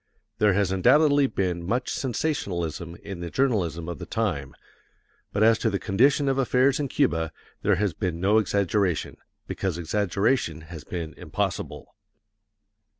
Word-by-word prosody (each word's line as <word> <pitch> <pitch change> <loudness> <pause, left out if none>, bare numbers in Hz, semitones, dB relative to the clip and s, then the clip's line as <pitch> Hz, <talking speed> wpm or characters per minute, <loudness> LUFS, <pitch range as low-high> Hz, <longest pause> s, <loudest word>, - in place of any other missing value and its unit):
There 105 -2 +4
has 100 -1 +1
undoubtedly 145 - +4
been 90 -7 -2
much 120 +8 -1
sensationalism 85 - -2
in 95 -3 -7
the 85 0 -5
journalism 90 -10 0
of 85 - -5
the - - -7
time, 85 -12 -2 0.8
but 105 - +1
as 115 0 +5
to 115 - +1
the 100 - -1
condition 135 +10 +2
of 135 0 +1
affairs 130 +2 +3
in 145 - -1
Cuba, 80 - 0 0.3
there 105 - +3
has 100 -1 0
been 90 -5 -3
no 100 +4 +4
exaggeration, 100 -4 0 0.3
because 95 -4 -3
exaggeration 100 - 0
has 80 -1 -10
been 85 -3 -5
impossible. - - -4
100 Hz, 145 wpm, -25 LUFS, 85-120 Hz, 0.8 s, as